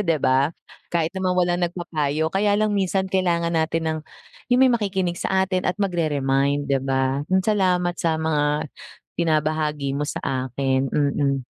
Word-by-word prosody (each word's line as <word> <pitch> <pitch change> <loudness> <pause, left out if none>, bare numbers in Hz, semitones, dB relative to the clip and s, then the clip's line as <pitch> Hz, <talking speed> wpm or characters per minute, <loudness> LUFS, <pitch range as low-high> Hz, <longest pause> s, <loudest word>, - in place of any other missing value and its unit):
hindi 165 - +3
ba. 130 +2 +3 0.4
Kahit 165 -2 0
naman 185 -1 0
walang 175 0 +1
nagpapayo. 160 -3 -2
Kaya 205 +1 +2
lang 215 0 +1
minsan 195 -1 +1
kailangan 170 -3 +1
natin 165 +1 0
ng 155 - -2 0.5
iyung 250 0 +3
may 260 - +5
makikinig 190 -6 -1
sa 190 0 +1
atin 185 -1 -2
at 180 - 0
magre-remind 145 -6 0
hindi 135 - +3
ba. 135 0 0
Iyun 190 0 +2
salamat 180 -4 +1
sa 165 -1 +1
mga 150 -1 0 0.5
binabahagi 155 -3 0
mo 150 - -1
sa - - -4 0.2
akin, 130 +1 0
mm. 140 -1 +1
160 Hz, 155 wpm, -23 LUFS, 145-185 Hz, 0.5 s, may